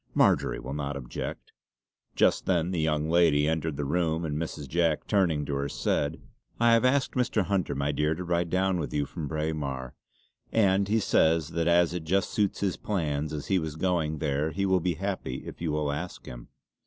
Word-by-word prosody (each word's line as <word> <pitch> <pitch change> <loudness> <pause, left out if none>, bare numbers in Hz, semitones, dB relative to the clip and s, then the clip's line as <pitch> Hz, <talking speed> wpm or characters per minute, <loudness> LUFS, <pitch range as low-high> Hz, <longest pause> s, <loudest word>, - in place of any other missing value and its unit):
"Marjory - - +3
will 65 +3 -6
not 70 -1 -3
object." 60 -3 -6 0.6
Just - - +2
then 90 -1 +1
the 90 - -1
young 75 -1 +1
lady 80 -3 +4
entered 80 -2 -1
the 75 - -2
room 80 +2 0
and 75 -2 -2
Mrs. 75 -2 -4
Jack 85 +1 +1
turning 85 -8 +1
to 70 - -3
her 70 +1 -1
said: 70 - -1 0.4
"I 120 0 +5
have 115 - +4
asked 130 +2 +2
Mr. 120 -4 +1
Hunter 90 -6 -1
my 70 +1 0
dear 75 +2 0
to 90 - -5
ride 85 -1 0
down 95 0 +1
with 75 - -4
you 75 -1 +1
from 80 +1 -6
Braemar; 75 -5 -3 0.6
and 100 -2 +3
he 110 +2 +2
says 80 -6 +2
that 85 0 -1
as 85 0 +4
it 90 -2 -4
just 95 +5 0
suits 105 -3 0
his 100 -3 0
plans 75 -7 -2
as 75 -2 -4
he 95 -2 +2
was 80 -2 -4
going 80 -3 0
there 70 +2 0
he 100 +4 -1
will 95 -1 +3
be 90 -1 -1
very 95 +5 -6
happy 90 -10 -3
if - - -9
you 75 -2 -1
ask 85 +5 -5
him." - - -9
80 Hz, 205 wpm, -28 LUFS, 75-90 Hz, 0.6 s, I